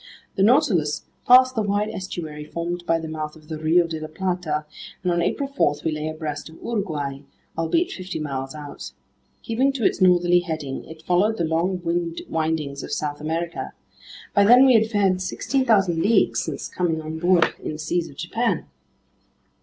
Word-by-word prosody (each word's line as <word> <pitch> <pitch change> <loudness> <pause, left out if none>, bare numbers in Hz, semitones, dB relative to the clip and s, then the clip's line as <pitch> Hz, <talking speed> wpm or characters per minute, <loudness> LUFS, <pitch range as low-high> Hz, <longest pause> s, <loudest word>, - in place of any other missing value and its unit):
The - - -2
Nautilus 195 - +3 0.2
passed 255 +1 +7
the 225 - 0
wide 205 +1 0
estuary 160 -5 -6
formed 170 +3 -4
by 165 - +3
the 160 - -6
mouth 155 -1 -5
of 155 0 -17
the 155 -1 -5
Rio 165 +3 +3
de 165 -1 -4
la 155 - -5
Plata, 165 -3 -2 0.4
and 180 - +1
on 170 0 +1
April 275 - -1
4 275 - +1
we 160 - +2
lay 155 0 -3
abreast 155 -1 -5
of 160 - -14
Uruguay, 155 -11 -3 0.4
albeit 330 - +1
fifty 185 0 -5
miles 135 -2 -4
out. 145 -2 -8 0.5
Keeping 255 +5 +1
to 250 -6 -2
its - - +1
northerly 175 -1 +5
heading, 155 -6 -4
it 160 0 -12
followed 200 +6 +2
the - - 0
long 170 0 -1
windings 155 -3 -2
of - - -8
South 145 -1 -3
America. 165 +2 -3 0.6
By 200 - +5
then 245 +6 +8
we 260 - +6
had 220 -1 +4
fared 195 -4 +2
16,000 195 -5 +1
leagues 220 +6 +3
since - - -4
coming 170 -3 -1
on 160 0 -6
board 175 0 +3
in - - -4
the - - -6
seas 165 +2 -2
of 140 - -14
Japan. 200 +1 -1
170 Hz, 175 wpm, -23 LUFS, 155-195 Hz, 0.6 s, then